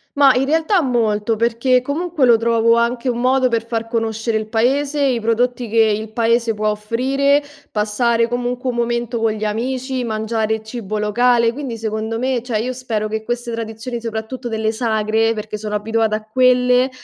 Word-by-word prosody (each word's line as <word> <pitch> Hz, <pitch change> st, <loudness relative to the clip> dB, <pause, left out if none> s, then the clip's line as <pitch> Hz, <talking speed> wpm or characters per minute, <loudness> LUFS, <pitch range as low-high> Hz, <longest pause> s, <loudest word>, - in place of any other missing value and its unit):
Ma, 280 Hz, -2 st, +6 dB
in 260 Hz, +2 st, +1 dB
realtà, 325 Hz, +5 st, +2 dB
molto 225 Hz, -4 st, 0 dB
perché 235 Hz, +3 st, +2 dB
comunque 315 Hz, +1 st, 0 dB
lo 235 Hz, -2 st, +6 dB
trovo 230 Hz, 0 st, +3 dB
anche 235 Hz, +2 st, 0 dB
un 240 Hz, 0 st, -2 dB
modo 260 Hz, 0 st, +3 dB
per 230 Hz, -2 st, 0 dB
far 230 Hz, -1 st, -3 dB
conoscere 225 Hz, -1 st, -1 dB
il 215 Hz, 0 st, -4 dB
paese, 275 Hz, +6 st, +1 dB
i 250 Hz, -3 st, +1 dB
prodotti 240 Hz, +1 st, 0 dB
che 230 Hz, -, -2 dB
il 215 Hz, 0 st, 0 dB
paese 230 Hz, 0 st, +1 dB
può 215 Hz, 0 st, -1 dB
offrire, 270 Hz, +7 st, +1 dB, 0.3 s
passare 230 Hz, +2 st, +1 dB
comunque 245 Hz, +1 st, -2 dB
un -, -, -7 dB
momento 235 Hz, 0 st, -1 dB
con 225 Hz, -1 st, +1 dB
gli 215 Hz, 0 st, -4 dB
amici, 255 Hz, +4 st, -2 dB
mangiare 220 Hz, -1 st, -2 dB
cibo 220 Hz, -2 st, -5 dB
locale, 235 Hz, +2 st, +2 dB
quindi, 260 Hz, -3 st, -5 dB
secondo 220 Hz, 0 st, -3 dB
me, 255 Hz, 0 st, -1 dB
cioè 235 Hz, -2 st, -2 dB
io 250 Hz, +4 st, -2 dB
spero 225 Hz, -4 st, -3 dB
che 220 Hz, 0 st, -4 dB
queste 240 Hz, +1 st, -3 dB
tradizioni, 230 Hz, +1 st, -5 dB
soprattutto 230 Hz, +2 st, -5 dB
delle 220 Hz, 0 st, -1 dB
sagre 220 Hz, -1 st, +1 dB
perché 215 Hz, 0 st, -5 dB
sono 210 Hz, 0 st, -4 dB
abituate 220 Hz, +1 st, 0 dB
a 215 Hz, -, -5 dB
quelle 250 Hz, +2 st, +3 dB
230 Hz, 175 wpm, -19 LUFS, 220-250 Hz, 0.3 s, Ma